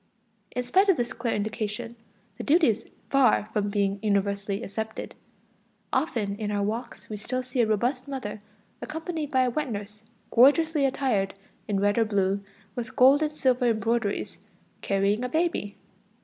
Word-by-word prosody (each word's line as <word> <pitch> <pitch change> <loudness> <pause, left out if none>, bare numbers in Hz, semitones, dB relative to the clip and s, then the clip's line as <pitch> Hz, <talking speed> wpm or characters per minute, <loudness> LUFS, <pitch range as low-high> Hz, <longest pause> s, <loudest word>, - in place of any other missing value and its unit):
In 250 - 0
spite 380 +11 +3
of 375 - +5
this 240 +1 -1
clear 235 -1 -2
indication, 215 +2 -3 0.4
the - - -3
duty 315 0 +4
is 225 +1 -1 0.3
far 260 -6 +4
from 205 -2 0
being 200 -1 0
universally 200 0 0
accepted. 220 +1 -5 0.8
Often 215 -10 0
in 210 -1 -3
our 205 -1 0
walks 230 +4 -4
we 215 - -5
still 255 +5 -3
see 250 0 0
a 225 - +3
robust 245 +5 0
mother 250 -7 -5 0.4
accompanied 320 -1 -4
by 260 -2 +3
a 250 - +1
wet 295 +2 -2
nurse 210 0 -6 0.3
gorgeously 295 +4 +5
attired 255 -8 0 0.3
in 200 -2 0
red 205 +2 +2
or 225 - +4
blue, 200 -1 0 0.3
with 245 +2 -6
gold 270 +4 +6
and 305 -1 -1
silver 250 -1 +2
embroideries, 225 -2 0 0.4
carrying 200 +3 +1
a 250 - -2
baby. 315 -10 -1
230 Hz, 160 wpm, -27 LUFS, 205-265 Hz, 0.8 s, gold